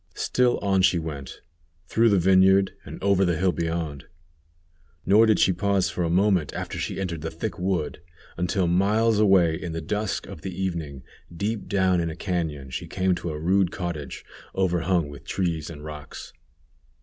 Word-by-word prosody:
Still 125 -1 +1
on 95 -1 +2
she 90 -1 +4
went, 75 -5 -6 0.4
through 115 +1 +3
the 100 - +4
vineyard, 95 +1 +5
and - - -8
over 100 -1 +3
the 85 -3 +1
hill 95 +2 +2
beyond; 80 -4 -3 1.0
nor 105 +4 +6
did 110 - +4
she 95 - +4
pause 100 +1 +1
for 90 - -2
a 85 - 0
moment 95 -3 +2
after - - -4
she - - -3
entered 85 -4 -3
the 80 - -3
thick 85 +5 -5
wood, 90 -5 -2 0.3
until 90 +2 0
miles 105 +5 +2
away 95 -6 +5
in 85 0 -5
the 80 - -3
dusk 105 +6 -2
of - - -10
the 95 0 -6
evening, 80 -8 -3 0.3
deep 105 +5 -3
down 95 -2 +2
in 85 -1 -1
a 80 - -6
cañon 80 -8 -3
she - - -5
came 95 -1 +1
to 90 - -4
a 75 - -4
rude 95 +3 +2
cottage 85 -8 -5 0.3
overhung 90 -3 +1
with 70 -1 -11
trees 85 -5 -2
and 75 -2 -9
rocks. 75 -1 -9
90 Hz, 175 wpm, -25 LUFS, 80-95 Hz, 1.0 s, nor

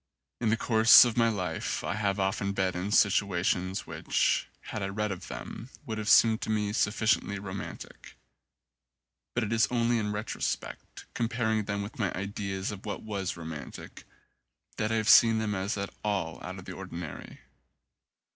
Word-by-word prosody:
In 115 - +1
the 115 - +2
course 115 +1 +7
of 120 -2 -1
my 115 -1 +4
life 90 -7 -3
I - - -2
have 100 -2 0
been 95 -1 0
often 100 0 -2
in 95 0 -1
situations 95 -2 +2
which, - - 0
had 110 - -6
I 95 - -1
read 105 +1 -2
of 90 -2 -6
them, 115 - -8 0.2
would 110 -1 -4
have 105 - -2
seemed 110 -1 +6
to - - -4
me 105 -1 0
sufficiently 100 -2 +1
romantic; 95 -1 -8 1.2
but 120 - +1
it 110 +1 -2
is 115 0 +3
only 120 -1 +1
in 105 -1 -2
retrospect, 105 +1 -4
comparing 110 -2 0
them 100 0 -2
with 105 +5 -9
my 100 -4 0
ideas 100 0 -3
of 100 -1 -8
what 100 -3 -5
was 100 -5 -3
romantic, 80 -3 -8 0.7
that 110 +1 -1
I - - +1
have 110 -1 0
seen 115 -1 +7
them 110 -1 -1
as 100 +2 -2
at 100 0 -4
all 100 -6 -2
out - - -6
of - - -10
the - - -7
ordinary. 85 -3 -8
105 Hz, 170 wpm, -29 LUFS, 95-110 Hz, 1.2 s, course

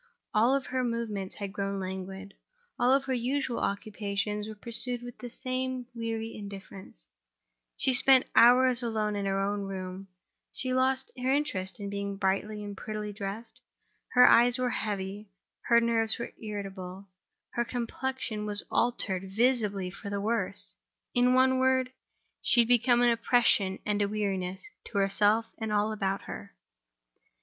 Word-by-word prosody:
All 240 +6 +4
her 260 -1 -3
movements 225 -5 -3
had 200 -2 -6
grown 200 -1 -2
languid; 190 +1 -6 0.5
all 260 +3 +4
her 265 -1 -3
usual 250 0 -1
occupations 205 0 -2
were 215 - -7
pursued 240 +3 +3
with 245 -1 -9
the 245 - -7
same 255 0 -3
weary 225 -1 -4
indifference; 195 - -10 0.7
she 265 - +1
spent 260 0 +6
hours 250 +1 +6
alone 215 -3 -1
in 200 -1 -2
her 195 0 0
own 200 +1 -1
room; 190 0 -6 0.4
she 255 -1 -2
lost 260 +1 +1
her 255 +1 0
interest 210 -11 -1
in 200 -1 -5
being 200 0 -4
brightly 205 +2 -1
and 205 -1 -6
prettily 210 0 -5
dressed; 205 +2 -7 0.5
her 250 0 +8
eyes 240 +1 +6
were 250 -1 0
heavy, 200 -1 -3 0.4
her 235 -1 +6
nerves 230 -1 +1
were 235 - -6
irritable, 195 -3 -6 0.5
her 235 - 0
complexion 240 -2 -3
was 205 0 +1
altered 195 -6 0
visibly 210 -5 +1
for 200 +1 -8
the 200 0 -2
worse—in 230 +4 -1
one 260 0 +4
word, 260 -1 +2 0.5
she 240 - +5
had 230 - 0
become 245 0 +4
an 240 - +5
oppression 230 -5 +2
and 210 0 0
a 200 - +2
weariness 195 - -3 0.2
to 225 - -6
herself 205 +3 +3
and 220 -1 -3
to 210 - 0
all 210 +1 +1
about 195 -2 -2
her. - - -9
215 Hz, 150 wpm, -29 LUFS, 200-245 Hz, 0.7 s, her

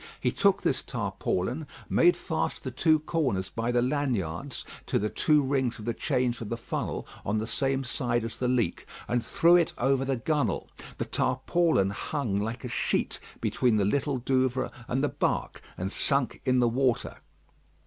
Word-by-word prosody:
He - - +1
took - - +2
this - - +1
tarpaulin, 125 - -2 0.2
made 175 0 +4
fast 160 -2 -2
the 130 - -3
two 155 +5 +4
corners 135 - -1
by 115 +1 -1
the 120 0 +2
laniards 125 - -2 0.2
to - - +1
the 105 +1 -1
two 150 -2 +3
rings 130 -3 0
of 105 - -9
the 120 - 0
chains 125 +1 0
of 110 - -5
the 115 - -2
funnel 115 - -3 0.2
on 105 +2 0
the 110 - -1
same 135 +2 0
side 120 -2 -1
as 115 - -5
the 125 - 0
leak, 120 -8 0 0.2
and 120 -1 0
threw 170 +1 +4
it 170 - +1
over 135 +1 +2
the 135 -1 0
gunwale. 125 - 0 0.3
The - - -2
tarpaulin 130 - +1
hung 120 0 -2
like 110 +3 -3
a - - -3
sheet - - 0 0.2
between 125 -3 +2
the 100 -2 +2
Little 140 +5 +1
Douvre 130 +1 +1 0.2
and 130 +3 0
the 145 - +2
bark, - - -1 0.2
and 95 +2 -3
sunk 140 +1 +1
in 130 -1 +3
the 120 -1 +4
water. 125 +1 0
125 Hz, 180 wpm, -28 LUFS, 115-140 Hz, 0.3 s, made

